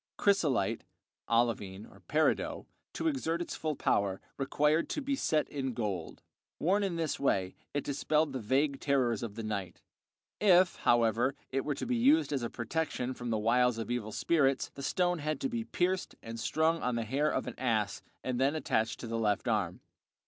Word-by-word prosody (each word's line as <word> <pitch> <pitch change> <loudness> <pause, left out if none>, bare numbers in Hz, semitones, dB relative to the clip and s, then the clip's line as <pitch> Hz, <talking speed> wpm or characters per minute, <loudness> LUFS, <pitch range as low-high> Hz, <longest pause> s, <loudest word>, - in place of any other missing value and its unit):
Chrysolite 155 - +2 0.5
(olivine, 115 -4 0 0.2
peridot), 155 +1 +1 0.3
to - - -1
exert 210 - 0
its 175 - -4
full 155 -2 -2
power, 100 -6 +1 0.2
required 150 +3 +1
to - - -2
be 280 -1 -1
set 155 - +1
in 135 -4 -3
gold; 100 -8 -4 0.3
worn 195 +6 +2
in 195 -4 -1
this 165 -3 -1
way 95 -9 +1 0.2
it 145 - 0
dispelled 150 +1 +1
the 130 - -2
vague 135 +5 +1
terrors 130 -6 +1
of 115 -4 -5
the 115 - -5
night. 100 -4 -4 0.6
If, 185 -3 +5
however, 120 +3 +3 0.2
it 135 0 0
were 145 - -1
to - - -4
be 250 0 0
used 280 - +4
as 135 - 0
a 120 - -2
protection 130 +1 -2
from 120 -1 -6
the 110 - +1
wiles 120 +2 +3
of 115 +1 -4
evil 115 -3 -2
spirits, 135 0 +1
the 140 - -8
stone 175 +4 +1
had 155 -1 -2
to 270 - 0
be 235 -2 -3
pierced 185 -1 -1
and 115 0 -6
strung 160 +6 +1
on 125 -1 0
the 115 -1 -1
hair 140 +6 +1
of - - -1
an - - -5
ass 110 -6 0 0.2
and 125 -1 -2
then 140 +3 +3
attached 115 -7 0
to 120 - -5
the 115 0 -2
left 105 -1 0
arm. 100 -6 0
135 Hz, 185 wpm, -31 LUFS, 115-160 Hz, 0.6 s, If